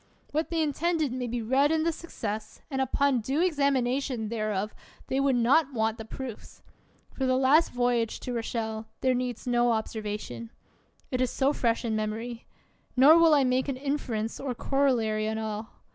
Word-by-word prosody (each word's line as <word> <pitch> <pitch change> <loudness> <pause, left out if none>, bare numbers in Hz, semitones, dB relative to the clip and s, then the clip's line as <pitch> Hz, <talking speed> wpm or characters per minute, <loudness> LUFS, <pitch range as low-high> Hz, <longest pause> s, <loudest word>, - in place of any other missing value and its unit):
What 310 +2 -1
they 330 -2 +1
intended 310 -1 0
may 250 -1 -3
be 235 0 -3
read 270 +6 +3
in 320 -1 +2
the 335 - +2
success, 220 -10 -6
and 265 -1 0
upon 265 -1 +2
due 270 +7 -1
examination 275 -7 +1
thereof 215 -2 -2 0.4
they 265 - +1
would 275 -1 +3
not 270 +5 +3
want 220 -1 0
the 220 - -6
proofs. 245 0 -8 0.5
For 265 - -1
the 255 0 +3
last 275 +5 +4
voyage 245 -2 0
to 250 - -4
Rochelle, 225 -1 -3
there 260 -1 +3
heeds 245 -2 -3
no 240 -1 +2
observation; 220 +1 -4 0.6
it 255 -1 0
is 255 - +2
so 275 +3 +1
fresh 235 -2 0
in 220 -1 0
mem 215 0 -1
ory. 230 +1 -7 0.5
Nor 300 +6 +8
will 330 -2 +6
I 280 - +4
make 255 +1 +1
an 275 -2 -2
inference 255 -6 -2
or 265 -3 -3
corollary 230 -6 +1
on 220 - -2
all. 220 0 -4
250 Hz, 175 wpm, -28 LUFS, 225-275 Hz, 0.6 s, Nor